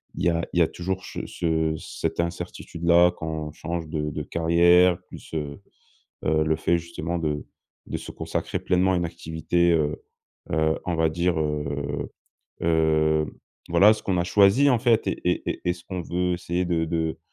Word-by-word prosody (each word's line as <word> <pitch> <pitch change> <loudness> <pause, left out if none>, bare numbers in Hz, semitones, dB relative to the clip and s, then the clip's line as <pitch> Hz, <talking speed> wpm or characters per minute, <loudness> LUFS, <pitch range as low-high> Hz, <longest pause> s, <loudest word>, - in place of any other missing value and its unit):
y 85 - +1
a 85 0 0
il 90 - +2
y - - +6
a 80 - +5
toujours 95 +1 -4
che - - -9
ce 80 -2 0
cette - - -4
incertitude-là 85 0 +1
quand 80 -1 -4
on - - -7
change 80 +1 -5
de 75 -2 -2
de - - -4
carrière. 85 +2 +4
Plus, - - -12
heu 75 -3 -4 0.6
heu, 80 0 +2
le 80 0 +1
fait 85 +2 +1
justement 85 0 -4
de 75 -2 -2 0.4
de - - -3
se - - -8
consacrer - - -3
pleinement 95 +1 +2
à - - +2
une 85 - 0
activité, 85 +1 0
heu 75 -1 0 0.5
heu, 80 +1 +1
on 90 -2 -1
va 80 0 +3
dire, 85 +1 0
heu 75 -2 -2 0.5
heu, 80 -1 +2 0.4
voilà 105 +2 +6
ce - - -10
qu'on 95 - 0
a 85 - +1
choisi, 100 +10 +5
en 125 - +3
fait 115 -4 +2
et - - -2
et 90 - 0
et - - -4
et 90 - +2
ce 90 -1 -11
qu'on 90 -2 -4
veut 90 +1 -1
essayer 90 +1 -2
de 85 -2 0
de 80 -1 -2
85 Hz, 185 wpm, -25 LUFS, 80-90 Hz, 0.6 s, y